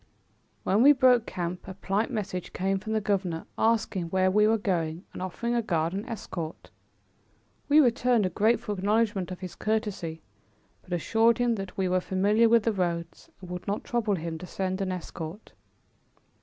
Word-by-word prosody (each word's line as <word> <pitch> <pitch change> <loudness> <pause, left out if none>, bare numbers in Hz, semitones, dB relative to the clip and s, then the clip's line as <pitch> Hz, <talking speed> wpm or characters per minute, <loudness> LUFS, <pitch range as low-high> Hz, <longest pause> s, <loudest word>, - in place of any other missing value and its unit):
When 200 +4 +2
we 285 +3 +8
broke 250 -4 +4
camp 175 0 -4
a 190 - -7
polite 200 +4 -1
message 200 -7 -4
came 195 +1 0
from 220 +3 -4
the 220 - +2
governor, 185 -5 -1
asking 220 -5 +1
where 185 +2 +2
we 210 +2 +4
were 225 +1 +3
going 175 -4 -2
and - - -7
offering 210 +6 -3
a 240 - +2
guard 170 -5 0
and 200 +4 -4
escort. 170 -7 -6 1.0
We 295 +2 +7
returned 245 -4 +3
a 185 - -1
grateful 210 +2 +1
acknowledgment 205 -1 +1
of 185 0 -7
his 180 -2 -6
courtesy, 205 -7 -2 0.6
but - - -18
assured 225 +7 +3
him 245 -1 +2
that 195 -4 -6
we 190 -1 +1
were 185 0 +1
familiar 205 +5 +3
with 230 -1 +5
the 225 - +1
roads 170 -3 -3
and 180 -1 -9
would 180 0 -6
not 205 +1 -2
trouble 230 -4 0
him 165 -1 -5
to 180 - -8
send 190 +1 -2
an 190 -1 -1
escort. 180 +1 -7
195 Hz, 180 wpm, -27 LUFS, 180-225 Hz, 1.0 s, we